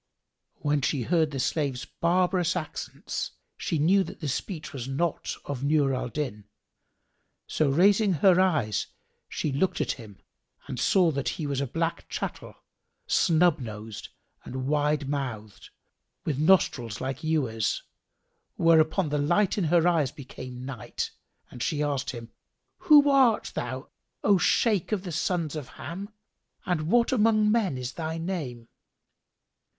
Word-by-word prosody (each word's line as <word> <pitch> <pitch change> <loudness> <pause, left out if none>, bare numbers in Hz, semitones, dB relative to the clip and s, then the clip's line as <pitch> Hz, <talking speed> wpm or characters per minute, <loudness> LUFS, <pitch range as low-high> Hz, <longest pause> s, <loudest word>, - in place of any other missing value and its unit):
When 145 -1 +1
she 130 -1 0
heard 160 +2 +2
the 140 -2 -5
slave's 135 -1 -1
barbarous 180 0 +1
accents, 165 -4 -5 0.2
she 165 - -2
knew 185 +6 +4
that - - -10
the 155 - -4
speech 155 +4 -4
was 130 -3 -5
not 150 +5 -2
of 140 -2 -4
Nur 140 -2 +3
al 125 -1 -2
Din; 115 -7 -4 1.0
so 155 -3 +1
raising 195 +7 +4
her 180 +3 +5
eyes 150 - +1 0.4
she 150 - -2
looked 180 +7 0
at - - 0
him 110 -6 -9 0.5
and - - -5
saw 180 -4 +4
that 140 -4 -1
he 155 - -3
was 140 -1 -1
a 140 - -1
black 165 +5 -2
chattel, - - -5 0.5
snub 170 -1 +3
nosed 110 -3 -7 0.3
and 130 +1 -5
wide 150 0 +1
mouthed, 120 -8 -5 0.6
with 145 -3 -1
nostrils 135 - +2
like 135 +2 -4
ewers; 135 -9 0 0.7
whereupon 165 +1 +3
the 150 0 0
light 185 +7 +2
in 195 - 0
her 170 +1 +3
eyes 160 -7 +2
became 125 -2 -9
night 130 -5 -5 0.4
and 120 - -9
she 150 +4 0
asked 145 -3 -1
him, 115 -2 -7 0.5
"Who 295 -4 +7
art 265 -5 +4
thou, 130 +3 -4 0.3
O 200 -2 +4
Shaykh 210 -3 +2
of 200 -3 0
the 180 - -5
sons 160 -1 -1
of 150 -4 -5
Ham 190 +7 -7 0.6
and 155 -4 -1
what 235 +2 +3
among 215 -3 +3
men 210 - +1
is 125 0 -5
thy 160 0 -4
name?" 150 -10 -4
155 Hz, 145 wpm, -27 LUFS, 130-180 Hz, 1.0 s, Who